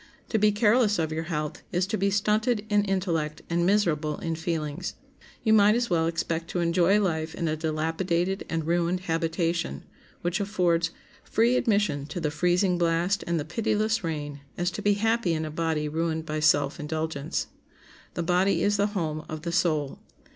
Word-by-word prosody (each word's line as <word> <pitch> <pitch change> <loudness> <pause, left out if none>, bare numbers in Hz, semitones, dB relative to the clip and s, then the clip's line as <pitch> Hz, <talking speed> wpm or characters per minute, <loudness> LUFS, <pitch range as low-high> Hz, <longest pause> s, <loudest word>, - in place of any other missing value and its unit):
To 220 - +1
be 210 +1 +4
careless 210 +1 +3
of 160 -2 -1
your 160 +1 -3
health 150 -3 -3
is 180 +1 +1
to 200 - -2
be 200 -1 +1
stunted 210 +2 +1
in 205 0 +4
intellect 170 -6 -1
and 170 +1 +2
miserable 160 -7 +1
in 165 - -3
feelings. 160 -3 -3 0.5
You 220 - +4
might 210 0 +6
as 235 -3 -1
well 165 -1 +2
expect 165 0 -2
to 180 - -3
enjoy 175 +4 +3
life 160 -5 -1
in 170 - -2
a 155 - 0
dilapidated 165 +4 -1
and 165 -1 -2
ruined 175 +2 +1
habitation, 165 - -1 0.4
which 175 +3 0
affords 180 -5 +1 0.3
free 235 +3 +2
admission 205 - +1
to 155 +4 -5
the 150 -3 -1
freezing 180 +3 +2
blast 170 +3 +1
and 170 -1 +1
the 145 - -3
pitiless 220 +3 0
rain, 145 -3 -4 0.2
as 175 +1 0
to 210 - -5
be 205 0 +3
happy 225 -4 +1
in 155 0 -2
a 155 - -5
body 160 -1 -1
ruined 160 +1 -2
by 155 -1 -2
self 145 -2 +3
indulgence. 155 0 -2 0.7
The 170 - -1
body 180 +3 +2
is 205 0 +2
the 200 +1 +2
home 155 -3 -2
of 155 0 -6
the 170 - -2
soul. 155 -5 0
170 Hz, 180 wpm, -27 LUFS, 160-200 Hz, 0.7 s, might